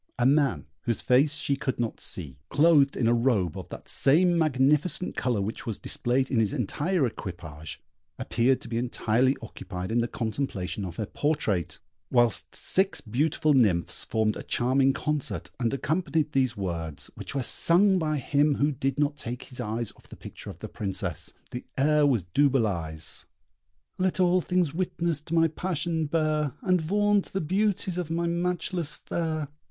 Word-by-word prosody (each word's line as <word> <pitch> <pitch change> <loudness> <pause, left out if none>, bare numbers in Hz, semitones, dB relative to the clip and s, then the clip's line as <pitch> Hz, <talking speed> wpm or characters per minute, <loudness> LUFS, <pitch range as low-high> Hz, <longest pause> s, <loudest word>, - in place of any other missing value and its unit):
A 120 - +1
man, 140 0 +3 0.2
whose 115 -2 -1
face 140 +4 +4
she 140 -2 0
could 135 -3 -3
not 115 -2 -2
see, 70 -7 -2
clothed 145 -2 +4
in 115 - +2
a 120 - +4
robe 115 - +1
of - - -7
that - - -9
same 175 +6 +4
magnificent 150 +2 +2
colour 120 -5 0
which 110 +4 -5
was 110 - -1
displayed 130 +2 0
in 125 - +2
his 110 +1 +1
entire 150 - 0
equipage, 85 -9 -7 0.4
appeared 125 +3 +1
to - - -9
be 115 0 -2
entirely 125 +2 +1
occupied 95 -3 -6
in 120 - +2
the 120 - +1
contemplation 110 -5 -3
of 85 -2 -7
her 110 - -2
portrait, 105 - -1 0.3
whilst 120 -4 +1
six 190 +1 +1
beautiful 150 +6 +1
nymphs 100 -10 +2
formed 110 -1 0
a - - -6
charming 130 +2 +2
concert, 150 +1 -3
and 120 -2 +1
accompanied 155 +1 0
these 130 -4 +1
words, 85 -6 -4
which - - -8
were 135 - 0
sung 185 +9 +4
by 155 -2 0
him 145 +2 +2
who 145 +2 +2
did 135 0 -2
not 145 0 +1
take 120 +2 -5
his 125 - -12
eyes 115 -1 -3
off - - -21
the - - -10
picture - - -10
of - - -8
the - - -7
Princess. 95 -4 -3 0.2
The 125 - -5
air 150 +1 +4
was 120 -9 +2
Duboulai's: 95 - +1 0.7
Let 185 0 +1
all 180 0 +4
things 180 -4 0
witness 170 -3 -1
to 160 +2 -4
my 165 0 +5
passion 165 -1 -2
bear, 155 -3 0
And 185 -3 +2
vaunt 205 +4 +1
the 195 - 0
beauties 190 +1 0
of 175 -3 -3
my 170 +1 -1
matchless 175 -1 -2
fair! 155 -3 -3
135 Hz, 170 wpm, -27 LUFS, 115-160 Hz, 0.7 s, my